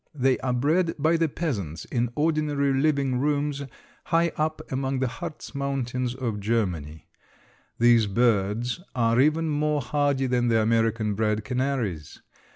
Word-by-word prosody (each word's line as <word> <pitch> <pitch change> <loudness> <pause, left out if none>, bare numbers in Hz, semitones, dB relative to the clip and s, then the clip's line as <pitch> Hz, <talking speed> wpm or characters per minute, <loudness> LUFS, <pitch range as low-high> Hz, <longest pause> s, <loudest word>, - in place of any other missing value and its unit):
They 135 -1 +2
are 130 - -1
bred 160 +8 +1
by 160 +3 +2
the 165 -1 +1
peasants 100 - -4
in 120 -1 -1
ordinary 150 -3 +1
living 135 -2 +1
rooms 145 0 0 0.4
high 170 0 +2
up 155 +1 -1
among 135 0 -1
the 130 0 0
Hartz 155 +7 -7
Mountains 130 -3 -2
of 120 -5 -3
Germany. 90 -9 -2 0.7
These 115 -2 +5
birds 115 - +1 0.2
are 115 0 +3
even 155 +3 +2
more 150 0 +1
hardy 145 -2 0
than 125 -1 +1
the 115 -1 +3
American 115 -1 +1
bred 105 0 0
canaries. 125 - -2
130 Hz, 140 wpm, -25 LUFS, 115-145 Hz, 0.7 s, These